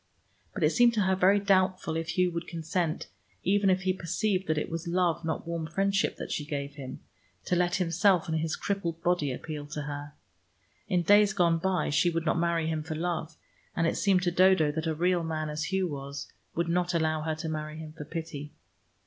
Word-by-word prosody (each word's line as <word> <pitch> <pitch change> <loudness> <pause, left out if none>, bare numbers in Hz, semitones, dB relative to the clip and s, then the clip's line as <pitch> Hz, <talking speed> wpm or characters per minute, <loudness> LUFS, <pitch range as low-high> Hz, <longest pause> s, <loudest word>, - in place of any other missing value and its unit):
But - - -2
it - - +4
seemed 240 -1 +4
to 215 - +2
her 190 0 +2
very 190 +2 +4
doubtful 185 -4 +2
if 165 +2 -3
Hugh 180 -1 +3
would 170 0 -4
consent, 165 0 -2 0.4
even 200 +1 +3
if 185 0 +3
he 185 0 +2
perceived 185 +2 -1
that 155 - +1
it - - -1
was 165 +1 -5
love 175 -1 +1
not 160 +1 -3
warm 165 -2 -3
friendship 195 +4 +1
that - - -6
she 150 - -1
gave 140 -1 -4
him, 135 -3 -8 0.4
to 180 - +1
let 175 0 +2
himself 180 +1 +2
and 160 -1 0
his 160 0 -1
crippled 170 -5 -3
body 175 -6 +1
appeal 145 +2 -6
to 150 0 -5
her. 145 0 -6 0.7
In 180 -1 +1
days 205 +3 +5
gone 170 -4 +3
by, 185 -2 0
she 155 +4 +3
would 165 -1 -2
not 170 +1 +2
marry 170 -1 +1
him 160 -1 -1
for 155 +1 -5
love, 165 -1 -3 0.4
and 165 - +1
it 165 - +1
seemed 190 -2 +2
to 175 - +1
Dodo 180 -4 +4
that 160 +2 -3
a 160 - 0
real 175 +2 +2
man, 155 -1 -2
as 155 +1 -2
Hugh 190 0 0
was, 140 -1 -6 0.2
would 170 0 0
not 175 +1 0
allow 160 -1 +1
her 160 0 -2
to 160 +1 -5
marry 155 -1 -4
him 155 -1 -8
for 155 - -7
pity. 155 -2 -6
165 Hz, 215 wpm, -29 LUFS, 155-185 Hz, 0.7 s, days